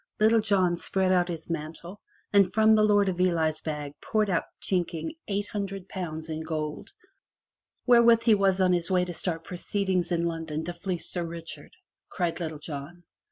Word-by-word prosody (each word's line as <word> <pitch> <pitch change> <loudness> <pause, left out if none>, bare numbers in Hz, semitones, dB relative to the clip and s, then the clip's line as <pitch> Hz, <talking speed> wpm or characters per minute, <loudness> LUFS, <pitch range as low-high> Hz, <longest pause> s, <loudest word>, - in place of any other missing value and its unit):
Little 220 +1 +5
John 190 -5 +2
spread 190 +1 0
out 180 -1 +3
his 165 -3 -6
mantle, 165 +4 -6 0.3
and 200 -2 +5
from 220 0 +5
the 215 - +5
Lord 205 -1 +4
of 180 -1 -1
Ely's 160 -4 +2
bag 150 -2 -4
poured 215 -2 0
out 170 - +1
chinking 170 - -2
eight 205 0 -1
hundred 195 -2 -4
pounds 160 -5 -5
in 160 0 -4
gold, 155 -2 -4 1.0
"Wherewith 235 -2 +6
he 230 - +5
was 195 -2 +3
on 185 -1 +4
his 175 0 0
way 180 -1 +2
to 180 - -5
start 165 -1 -3
proceedings 185 0 -2
in 170 -1 +1
London 160 -2 -3
to 175 - -4
fleece 175 -1 -4
Sir 175 - -2
Richard!" 165 0 -8 0.4
cried 175 -3 -2
Little 160 -3 -4
John. 150 +3 -8
175 Hz, 175 wpm, -27 LUFS, 165-195 Hz, 1.0 s, Wherewith